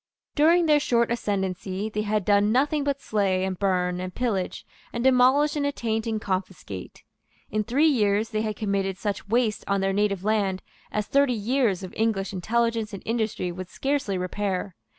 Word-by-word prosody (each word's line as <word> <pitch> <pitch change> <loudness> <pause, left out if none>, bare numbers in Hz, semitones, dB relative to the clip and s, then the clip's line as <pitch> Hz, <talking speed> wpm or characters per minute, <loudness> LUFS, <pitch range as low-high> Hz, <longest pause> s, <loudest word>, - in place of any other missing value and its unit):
During 330 +3 +4
their 300 -2 +5
short 235 -5 +1
ascendency 195 -3 -2
they 210 -1 -2
had 215 -2 -1
done 205 0 +4
nothing 285 +4 +2
but 280 -1 -1
slay, 195 -3 +1
and 190 -1 -3
burn, 180 -2 +1
and 185 0 -4
pillage, 210 -7 -2 0.3
and 235 - -3
demolish, 265 +4 +4
and 295 - 0
attaint, 230 -6 -1
and 220 -1 -1
confiscate. 185 - -5 0.5
In 215 0 0
three 260 +8 +2
years 215 -7 +2
they 215 -2 -1
had 215 -1 -2
committed 195 -2 -1
such 205 -1 -3
waste 225 -1 +1
on 200 0 +1
their 195 0 0
native 200 -2 0
land 200 -3 0 0.3
as 210 -1 -1
thirty 280 0 +3
years 225 -3 0
of 185 - -7
English 215 -3 0
intelligence 225 +3 0
and 195 - -7
industry 220 -5 -1
would 185 +1 -7
scarcely 270 -8 -1
repair. 185 0 -2
210 Hz, 170 wpm, -25 LUFS, 195-240 Hz, 0.5 s, their